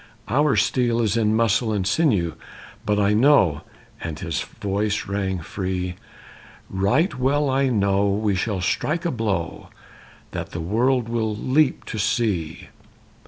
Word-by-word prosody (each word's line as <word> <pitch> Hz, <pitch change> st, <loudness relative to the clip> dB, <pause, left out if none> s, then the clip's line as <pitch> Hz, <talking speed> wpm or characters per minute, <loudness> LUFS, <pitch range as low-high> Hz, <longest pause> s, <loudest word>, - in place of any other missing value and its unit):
"Our 140 Hz, +3 st, +2 dB
steel 120 Hz, +2 st, +1 dB
is 110 Hz, -2 st, +1 dB
in 110 Hz, -1 st, +2 dB
muscle 115 Hz, 0 st, +2 dB
and 100 Hz, -3 st, -1 dB
sinew. 100 Hz, -, +2 dB, 0.5 s
But 105 Hz, 0 st, +2 dB
I 105 Hz, 0 st, +3 dB
know," 105 Hz, -, +4 dB, 0.4 s
and 80 Hz, -3 st, -5 dB
his 80 Hz, 0 st, -3 dB
voice 105 Hz, 0 st, -2 dB
rang 95 Hz, -2 st, -2 dB
free, 90 Hz, +1 st, -3 dB, 0.8 s
"Right 125 Hz, -, +1 dB
well 140 Hz, +2 st, +2 dB
I 135 Hz, 0 st, +2 dB
know 100 Hz, -3 st, +2 dB
we 105 Hz, +1 st, 0 dB
shall 95 Hz, 0 st, -1 dB
strike 155 Hz, -, -1 dB
a 170 Hz, -, +1 dB
blow 100 Hz, -, -3 dB, 0.6 s
That -, -, -6 dB
the 85 Hz, -, -4 dB
world 115 Hz, +8 st, +1 dB
will 110 Hz, -2 st, -1 dB
leap 135 Hz, +6 st, +1 dB
to 110 Hz, -, -5 dB
see." 100 Hz, -7 st, -1 dB
105 Hz, 140 wpm, -23 LUFS, 95-125 Hz, 0.8 s, know